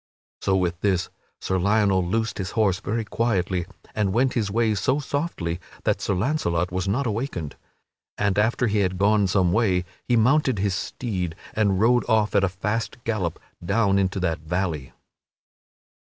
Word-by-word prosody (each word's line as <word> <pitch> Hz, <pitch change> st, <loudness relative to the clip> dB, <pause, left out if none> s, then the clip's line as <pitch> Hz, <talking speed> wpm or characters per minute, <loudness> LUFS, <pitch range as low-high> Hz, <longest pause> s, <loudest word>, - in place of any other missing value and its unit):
So, 95 Hz, -, +2 dB
with 90 Hz, -1 st, -1 dB
this, 95 Hz, -4 st, +1 dB, 0.3 s
Sir 95 Hz, 0 st, -1 dB
Lionel 100 Hz, -1 st, +3 dB
loosed 110 Hz, +6 st, -1 dB
his 95 Hz, -, -2 dB
horse 100 Hz, -4 st, +3 dB
very 110 Hz, +2 st, -2 dB
quietly 95 Hz, -6 st, 0 dB, 0.3 s
and 105 Hz, -3 st, 0 dB
went 125 Hz, +3 st, +2 dB
his 110 Hz, -4 st, 0 dB
way 110 Hz, +1 st, +2 dB
so 130 Hz, +7 st, +1 dB
softly 140 Hz, -, -2 dB, 0.2 s
that -, -, +1 dB
Sir 100 Hz, -, 0 dB
Launcelot 90 Hz, -, 0 dB
was 95 Hz, +1 st, -2 dB
not 125 Hz, +8 st, 0 dB
awakened. 110 Hz, -, -3 dB, 0.6 s
And 100 Hz, -1 st, +1 dB
after 115 Hz, +3 st, +2 dB
he 105 Hz, -2 st, +1 dB
had 95 Hz, -2 st, 0 dB
gone 100 Hz, +1 st, +3 dB
some 90 Hz, -2 st, +2 dB
way, 95 Hz, -5 st, +2 dB, 0.2 s
he 120 Hz, -, +3 dB
mounted 130 Hz, +2 st, +3 dB
his 100 Hz, 0 st, 0 dB
steed 95 Hz, -5 st, -3 dB, 0.2 s
and 100 Hz, -3 st, +2 dB
rode 120 Hz, +3 st, +4 dB
off 110 Hz, -2 st, +2 dB
at 100 Hz, -, +3 dB
a 95 Hz, -, +3 dB
fast 105 Hz, +6 st, -3 dB
gallop 95 Hz, -8 st, -2 dB, 0.2 s
down 100 Hz, +1 st, +2 dB
into 95 Hz, 0 st, 0 dB
that 85 Hz, -4 st, 0 dB
valley. 80 Hz, -4 st, -2 dB
100 Hz, 165 wpm, -24 LUFS, 90-115 Hz, 0.6 s, rode